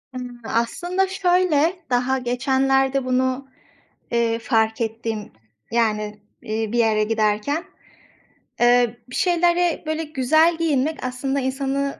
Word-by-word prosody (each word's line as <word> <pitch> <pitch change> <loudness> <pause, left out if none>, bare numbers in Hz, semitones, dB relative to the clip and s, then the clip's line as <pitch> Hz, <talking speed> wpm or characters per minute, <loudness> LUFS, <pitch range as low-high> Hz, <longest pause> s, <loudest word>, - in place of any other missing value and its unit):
Imm, 245 -1 -7
aslında 350 +13 0
şöyle; 360 -4 +2 0.2
daha 250 +2 +1
geçenlerde 265 +2 +1
bunu, 260 +1 0 0.6
eee, 230 -1 +1
fark 220 -1 +1
ettim, 225 -1 -3 0.4
yani, 215 -2 0 0.2
eee, 220 -1 -3
bir 240 - 0
yere 215 -2 +3
giderken. 220 - 0 1.0
Eee, 240 -1 +4
bir 245 - -8
şeylere 350 -1 +2
böyle 315 +1 -2
güzel 315 +3 +2
giyinmek 310 -2 0
aslında 260 +2 -2
insanı, 275 +1 -2
255 Hz, 110 wpm, -22 LUFS, 230-305 Hz, 1.0 s, Eee